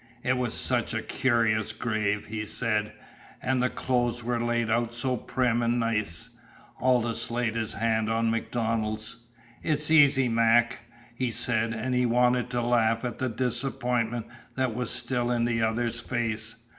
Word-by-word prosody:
"It 130 - +2
was 125 -2 -1
such - - +2
a - - -2
cur'ous 110 -4 +1
grave," 110 -3 -1
he 110 -1 -4
said. 105 -1 -1 0.5
"An' 130 0 0
the 125 0 +2
clothes 120 -2 -1
were 120 0 -1
laid 120 -1 0
out 120 0 +1
so 125 +2 -1
prim 120 0 0
an' 120 +1 +1
nice." 105 -7 -1 0.5
Aldous 120 -2 +1
laid 115 -1 -1
his 110 -2 -2
hand 110 0 0
on 115 0 +1
MacDonald's. 115 -1 -2 0.4
"It's 150 0 +1
easy, 140 -4 +6
Mac," 115 0 +3 0.3
he 125 +1 -1
said, 115 0 0
and 125 +3 -2
he 125 0 +2
wanted 125 +1 +2
to 120 -1 -1
laugh 115 -1 +2
at 120 - -4
the 130 - 0
disappointment 120 -1 -1 0.3
that 130 -3 0
was 125 +1 -2
still 120 -2 0
in 120 -1 +1
the 115 -1 0
other's 115 +1 0
face. 115 -2 -3
120 Hz, 155 wpm, -27 LUFS, 115-125 Hz, 0.5 s, easy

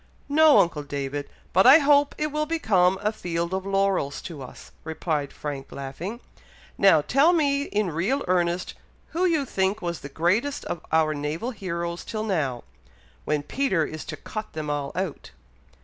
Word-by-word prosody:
"No, 310 +1 +6
uncle 165 -3 +3
David! 145 0 -4 0.2
but 190 +6 +5
I 270 +4 +10
hope 290 -1 +4
it 305 0 -1
will 305 +1 -1
become 195 - +2
a 210 - +2
field 170 -4 -3
of 190 +1 -2
laurels 195 -7 +1
to 160 -5 -7
us," 130 - -11
replied 155 -2 -2
Frank, 145 -2 -6
laughing. 160 - -6 0.5
"Now 190 -6 +5
tell 280 - +4
me 285 -4 +2
in 205 -7 -1
real 205 - -1
earnest 175 0 0 0.4
who 350 +3 0
you 315 -5 +1
think 195 -2 0
was 170 -3 -3
the 140 - -9
greatest 190 - 0
of 170 - -4
our 160 -1 +3
naval 155 - -3
heroes 170 -5 -4
till 215 -1 -4
now, 150 - -1 0.6
when 150 -1 0
Peter 190 - 0
is 155 -2 -7
to 155 - -6
cut 215 +7 -7
them 155 -1 -3
all 145 -1 -2
out." 185 -4 -4
180 Hz, 165 wpm, -25 LUFS, 155-235 Hz, 0.6 s, I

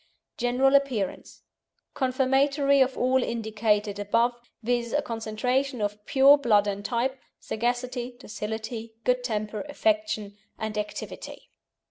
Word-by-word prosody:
GENERAL 250 +3 +2
APPEARANCE 250 -9 -3 0.5
Confirmatory 275 +2 +2
of 260 0 +2
all 255 +1 +3
indicated 215 -3 0
above, 230 +4 +2 0.3
viz., 240 0 0
a 295 - +2
concentration 250 +3 -1
of 210 0 -3
pure 280 +1 +6
blood 210 -6 +4
and 200 0 -3
type, 255 +4 -1 0.2
sagacity, 245 +2 -2
docility, 220 0 -6
good 250 0 +1
temper, 215 -3 -2
affection, 290 -10 -1 0.2
and 220 -1 -4
activity. 210 0 -6
240 Hz, 110 wpm, -26 LUFS, 215-265 Hz, 0.5 s, pure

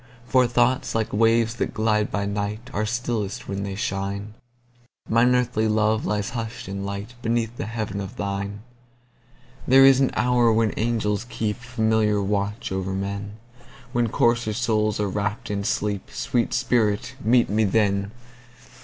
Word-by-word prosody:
For 125 0 +3
thoughts, 120 +3 +1
like 110 -1 -1
waves 115 +1 +3
that - - -2
glide 110 -1 +1
by 100 0 -2
night, 105 +4 -4
Are 110 +1 -1
stillest 120 -1 -3
when 100 0 -3
they 100 -1 -4
shine; 100 -2 -3 0.7
Mine 120 +3 +4
earthly 125 -3 +1
love 110 0 +1
lies 105 -1 -1
hush'd 115 0 -5
in 100 +1 -4
lightBeneath 115 +3 -3
the 110 - -4
heaven 110 -3 -3
of 95 - -7
thine. 100 +1 -4 1.1
There 135 +1 +7
is 135 -1 +7
an 135 - +3
hour 120 -1 +3
when 110 -1 +2
angels 110 -1 0
keepFamiliar 110 -2 0
watch 100 +1 -2
o'er 95 0 -2
men, 100 +1 -4 0.6
When 120 -1 +1
coarser 120 -1 +2
souls 110 -2 0
are 105 - +1
wrapp'd 105 +2 -3
in 100 -1 -2
sleep—Sweet 105 +3 -1
spirit, 110 0 +1
meet 120 +2 +4
me 110 +2 +1
then! 100 -1 +1
110 Hz, 145 wpm, -24 LUFS, 100-120 Hz, 1.1 s, There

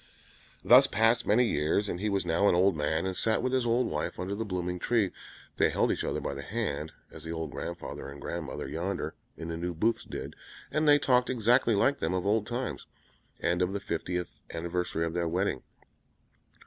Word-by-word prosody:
Thus - - +8
passed 115 +3 +2
many 120 +4 +4
years, 80 +2 +1
and 90 - -3
he 105 +2 -1
was 100 -3 0
now 85 +4 +3
an - - +3
old 95 +1 +4
man, 80 +3 0
and 95 -1 -2
sat 110 +4 +1
with 130 - 0
his 130 -2 +1
old 120 +2 +2
wife 75 0 -3
under 95 +2 -3
the 110 +3 -2
blooming 90 -3 -3
tree. 110 -3 +1 0.5
They - - +4
held - - +1
each - - -2
other - - -1
by - - -3
the 70 - -6
hand, 80 -4 -3 0.2
as 80 - -11
the 80 - -5
old 80 -2 -4
grand - - -5
father - - -7
and 70 0 -10
grand 85 +3 -4
mother 65 - -5
yonder 90 +5 -3 0.2
in 80 0 -6
the 80 - -3
New 85 +1 -3
Booths 115 +8 +1
did, - - -7 0.4
and 155 0 +2
they 145 - +8
talked 125 -3 +2
exactly 120 -1 +3
like 135 +8 +2
them 80 +3 -1
of 90 0 -2
old 105 +1 +1
times, 125 +2 -4 0.5
and 85 +1 +1
of 90 +1 +1
the 100 - -1
fiftieth 90 -2 -4
anniversary 85 0 -2
of 80 - -3
their 85 -1 0
wedding. 90 -5 0
90 Hz, 210 wpm, -29 LUFS, 85-115 Hz, 0.5 s, Thus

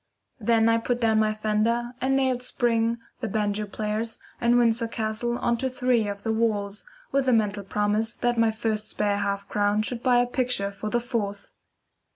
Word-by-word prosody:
Then 225 0 +3
I 230 0 +4
put 240 +1 -1
down 220 -2 +3
my 215 0 +3
fender, 220 +3 0
and 270 +1 +2
nailed 260 -2 +1
"Spring," 235 -2 +1 0.2
"The 235 - -2
Banjo 210 0 -1
Players," 215 +2 -3 0.2
and 240 0 +4
"Windsor 230 -1 +3
Castle" 225 +1 -2
on 235 -1 +1
to 260 +3 -1
three 250 -3 +1
of 200 0 -5
the 225 - 0
walls, 210 -2 -1 0.3
with 275 -1 +1
the 255 - +4
mental 210 -2 +1
promise 210 +3 0
that 240 0 0
my 230 -1 +3
first 220 -1 -2
spare 205 -1 0
half 200 0 -2
crown 205 +1 +1
should 235 +1 -3
buy 250 -1 +4
a 245 - +4
picture 245 -5 -1
for 205 +2 -5
the 240 - +1
fourth. 210 -5 -3
225 Hz, 190 wpm, -26 LUFS, 210-240 Hz, 0.3 s, I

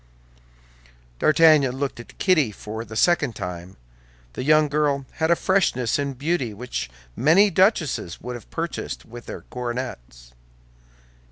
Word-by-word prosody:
D'Artagnan 155 -4 +5
looked 140 -3 -3
at 120 - -12
Kitty 155 - +3
for 110 +2 -7
the 110 -1 -10
second 150 -3 +2
time. 90 -1 -7 0.6
The - - -5
young 155 +2 +4
girl 145 -2 0
had 165 +1 +2
freshness 145 - +1
and 140 -2 -3
beauty 140 -6 -1
which 115 - -5 0.3
many 180 - +5
duchesses 165 - +1
would 125 +1 -6
have 120 - -10
purchased 165 0 -4
with 120 +1 -11
their - - -7
coronets. 120 - -6
135 Hz, 125 wpm, -23 LUFS, 115-155 Hz, 0.6 s, D'Artagnan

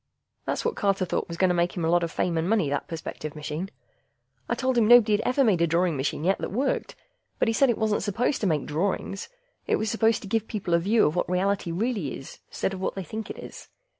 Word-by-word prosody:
That's - - -2
what 470 - 0
Carter 195 -2 +1
thought 170 - -2
was 170 - -6
going 185 0 +3
to - - +2
make 175 +1 0
him 170 - -1
a - - +1
lot 175 0 +4
of 170 - -1
fame 175 -2 -1
and 165 +2 0
money, 200 -10 +2
that 145 - -2
perspective 155 -2 -6
machine. 150 +5 -4 0.8
I - - +1
told 260 0 0
him 230 -3 +4
nobody'd 220 -3 +6
ever 265 +2 +2
made 200 -8 +3
a 170 - +4
drawing 170 0 +1
machine 140 +2 -2
yet 190 +3 +2
that - - -4
worked, 260 +7 -1 0.4
but - - +1
he 225 - +2
said 270 +3 +4
it 235 - +1
wasn't 215 -1 +1
supposed 235 +7 0
to 205 - +1
make 155 -4 0
drawings. 190 +5 -2 0.4
It - - +3
was 220 - -1
just - - -1
supposed 225 0 +2
to - - -7
give 225 +2 0
people 195 -5 -3
a 170 - +5
view 210 +6 +3
of 150 - +1
what 180 - 0
reality 190 0 0
really 200 - -2
is, 135 - -11
instead 195 - -2
of 190 - -6
what - - -2
they 195 - -4
think 215 +6 -6
it - - -6
is. - - -10
195 Hz, 255 wpm, -26 LUFS, 170-220 Hz, 0.8 s, nobody'd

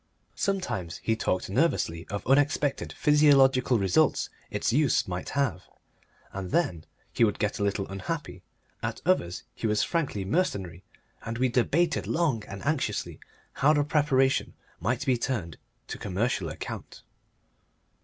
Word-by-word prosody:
Sometimes 185 - -2
he 110 - +1
talked 95 -4 -1
nervously 95 - 0
of 100 0 -5
unexpected 140 +1 +2
physiological 135 -4 +4
results 95 -3 +2 0.2
its - - -1
use 145 -2 +3
might 90 -1 -4
have, 135 - 0 0.7
and 95 -1 -5
then 90 - 0 0.3
he - - +3
would 105 -3 +2
get 105 0 -1
a - - 0
little 100 -1 -1
unhappy; 120 - -5 0.4
at - - -3
others 90 - +1
he 115 - -3
was 105 -1 +2
frankly 140 - -1
mercenary, 95 - -1 0.4
and 115 0 -4
we 130 +1 +2
debated 155 +8 +1
long 155 -10 +1
and 100 0 -8
anxiously 155 -1 -1 0.3
how 150 +3 +4
the 145 -1 +3
preparation 140 -3 +2 0.2
might 120 - -1
be 130 -4 +2
turned 105 - -3 0.3
to - - -7
commercial 100 -2 -1
account. 75 - -7
120 Hz, 135 wpm, -27 LUFS, 95-145 Hz, 0.7 s, physiological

